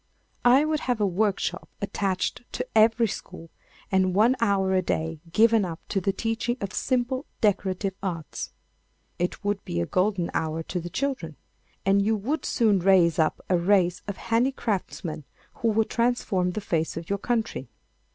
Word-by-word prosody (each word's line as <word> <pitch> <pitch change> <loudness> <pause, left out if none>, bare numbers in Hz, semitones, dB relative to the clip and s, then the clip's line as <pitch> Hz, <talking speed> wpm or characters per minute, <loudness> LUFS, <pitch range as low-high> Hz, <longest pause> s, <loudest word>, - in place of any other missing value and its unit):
I 260 +5 +6
would 310 0 0
have 245 -4 -1
a 210 - +3
workshop 195 -1 -1
attached 195 -1 -1
to 250 - -2
every 225 +2 +5
school, 180 -4 -8 0.4
and 185 -1 +2
one 230 +5 +5
hour 195 -4 +2
a 185 - +3
day 160 -2 -2
given 225 +2 +5
up 165 -3 -4
to 195 - 0
the 195 - +1
teaching 225 +4 -2
of 200 -1 -4
simple 255 +1 -1
decorative 195 -2 +1
arts. 170 -6 -4 0.7
It 175 +3 -2
would 205 -1 -1
be 85 - -3
a 85 - 0
golden 185 - 0
hour 160 0 -1
to 180 - -3
the 175 +1 -6
children. 255 - -3 0.5
And 195 +1 +4
you 220 +2 +2
would 260 +10 -2
soon 215 -6 +3
raise 175 -3 +4
up 155 - +1
a 180 -2 +2
race 180 -1 +2
of 200 - -4
handicraftsmen 225 - -1 0.4
who 230 - +2
would 220 0 +1
transform 225 -7 +1
the 215 - -3
face 165 -5 -1
of 165 0 -6
your 200 0 -1
country. 225 - -2
200 Hz, 165 wpm, -26 LUFS, 180-225 Hz, 0.7 s, I